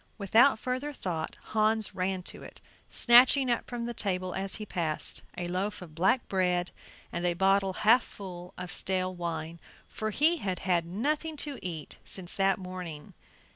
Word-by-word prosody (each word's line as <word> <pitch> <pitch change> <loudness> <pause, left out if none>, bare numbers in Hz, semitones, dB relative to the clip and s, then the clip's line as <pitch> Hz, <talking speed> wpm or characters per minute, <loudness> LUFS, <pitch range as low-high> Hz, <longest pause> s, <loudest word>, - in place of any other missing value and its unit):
Without 225 +5 +5
further 255 +5 -3
thought 170 - -4 0.2
Hans 220 0 +2
ran 185 0 -2
to - - -6
it, - - -12 0.3
snatching 250 +2 +6
up 235 - -1
from 240 -1 -4
the 240 - -3
table 185 -4 -1
as 195 0 -2
he 215 - -6
passed 165 -6 -2 0.2
a 175 - -3
loaf 185 +3 -2
of 175 -4 -11
black 190 +10 +2
bread 180 -2 +1 0.4
and 170 - -3
a 175 -1 +1
bottle 195 +1 +3
half 235 +4 +7
full 180 -3 -9
of 180 -2 -6
stale 185 0 +1
wine, 170 -1 -4 0.3
for 215 -1 -4
he 310 +10 +4
had 190 - -2
had 175 -3 0
nothing 300 - -1
to 285 -2 -4
eat 165 -4 -6
since 180 -2 -7
that 195 -1 +3
morning. 180 -5 -7
190 Hz, 170 wpm, -29 LUFS, 180-225 Hz, 0.4 s, half